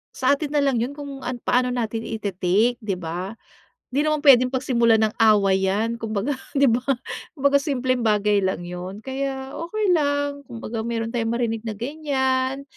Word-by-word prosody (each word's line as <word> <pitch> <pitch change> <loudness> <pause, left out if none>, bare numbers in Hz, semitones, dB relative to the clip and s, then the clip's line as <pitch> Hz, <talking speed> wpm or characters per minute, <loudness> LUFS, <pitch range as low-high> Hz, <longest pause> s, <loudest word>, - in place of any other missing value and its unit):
Sa 260 +2 +3
atin 290 0 -4
na 290 -1 +2
lang 270 -4 +2
yun 255 +5 -2
kung 280 -2 -7
an 250 - -2
paano 250 0 +2
natin 225 -2 -2
i-te-take 205 +2 0
di 205 -4 -2
ba? 180 +5 -5 0.6
Hindi 285 +4 +1
naman 305 -1 +1
puwedeng 255 -3 +6
pagsimulan 235 -4 +3
ng 215 - -5
away 195 -3 +4
yan 225 +4 0
kumbaga 220 +3 -2 0.2
di 280 0 +4
ba? 235 - +3 0.6
Kumbaga 280 -1 +3
simpleng 255 -4 0
bagay 210 -1 +3
lang 190 -1 -1
yun 180 +3 -6
kaya 265 0 -4 0.2
okey 430 +4 -1
lang, 285 -2 0
kumbaga 230 -1 -5
mayro'n 230 -1 -2
tayong 225 -1 0
marinig 225 -2 -1
na 215 - -3
ganyan, 265 -1 -1
245 Hz, 170 wpm, -23 LUFS, 215-275 Hz, 0.6 s, puwedeng